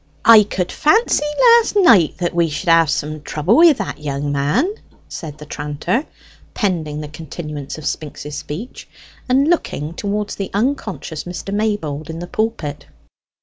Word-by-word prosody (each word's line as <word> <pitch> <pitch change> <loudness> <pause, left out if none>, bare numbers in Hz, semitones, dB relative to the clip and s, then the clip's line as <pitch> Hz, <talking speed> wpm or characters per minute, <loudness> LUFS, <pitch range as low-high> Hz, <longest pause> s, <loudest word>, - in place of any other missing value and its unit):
"I 225 -2 +9
could 190 -3 -2
fancy 355 -1 +2 0.3
last 470 -2 +3
night 230 - +5
that 175 -1 -2
we 170 -1 +2
should 150 +3 -3
have 165 -2 +5
some 150 0 -2
trouble 155 +8 +1
wi' 330 -1 +8
that 200 - -5
young 145 -1 -3
man," 150 - +1 0.3
said 155 -3 -8
the 150 - -10
tranter, 150 - -2 0.5
pending 160 -8 -1
the 150 - -6
continuance 150 -2 -7
of 155 - -9
Spinks's 150 -1 -5
speech, 190 - -7 0.4
and 270 +3 +3
looking 165 - -1
towards 205 +3 -3
the 195 - -4
unconscious 210 - -2
Mr. 180 +3 -6
Maybold 205 -9 -2
in 160 - -5
the 175 - -5
pulpit. 215 -8 -3
170 Hz, 150 wpm, -19 LUFS, 150-220 Hz, 0.5 s, I